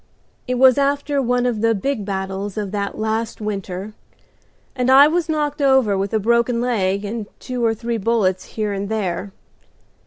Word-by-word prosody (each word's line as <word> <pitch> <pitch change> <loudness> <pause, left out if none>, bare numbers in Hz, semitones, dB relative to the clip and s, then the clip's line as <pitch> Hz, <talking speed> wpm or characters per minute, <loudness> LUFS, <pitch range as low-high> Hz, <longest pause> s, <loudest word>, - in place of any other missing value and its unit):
It 250 - 0
was 260 +1 +5
after 285 0 +1
one 245 -1 +1
of 235 -4 -1
the 230 0 +3
big 215 +1 -2
battles 195 0 -4
of 205 -3 -3
that 200 -1 -3
last 220 +1 -2
winter, 200 -1 -5 0.8
and 250 -1 0
I 275 +2 +8
was 335 +1 0
knocked 295 -2 -1
over 265 -7 +4
with 195 +1 -2
a 220 - +1
broken 235 +2 +2
leg 205 -5 0
and 215 0 -4
two 250 -1 -4
or 225 -1 +2
three 235 +1 -3
bullets 195 -4 0
here 215 -2 -3
and 200 0 -4
there. 200 -3 -2
225 Hz, 175 wpm, -20 LUFS, 200-250 Hz, 0.8 s, I